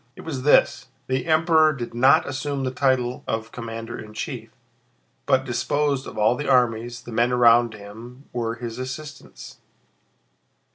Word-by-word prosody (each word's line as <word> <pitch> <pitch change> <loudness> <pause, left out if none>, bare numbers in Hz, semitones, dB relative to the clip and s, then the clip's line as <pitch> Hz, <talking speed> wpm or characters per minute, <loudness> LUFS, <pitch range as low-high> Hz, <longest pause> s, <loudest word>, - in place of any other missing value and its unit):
It - - -11
was 145 -6 -5
this: 130 -2 +3 0.2
the 130 +4 -2
Emperor 160 -1 +4
did 120 -5 -6
not 135 +6 +4
assume 140 0 -3
the 130 - -1
title 130 -2 0
of 110 0 -3
commander 115 -1 -7
in 110 0 -11
chief, - - -5 0.8
but 130 0 +2
disposed 135 +3 -1
of - - -9
all 110 +3 +3
the 145 +3 -4
armies; 120 -1 +1
the 120 - -10
men 120 +2 +1
around 120 -2 +4
him 115 +6 -12
were 115 -1 -2
his 120 0 -7
assistants. 140 +3 -8
125 Hz, 150 wpm, -23 LUFS, 115-140 Hz, 0.8 s, Emperor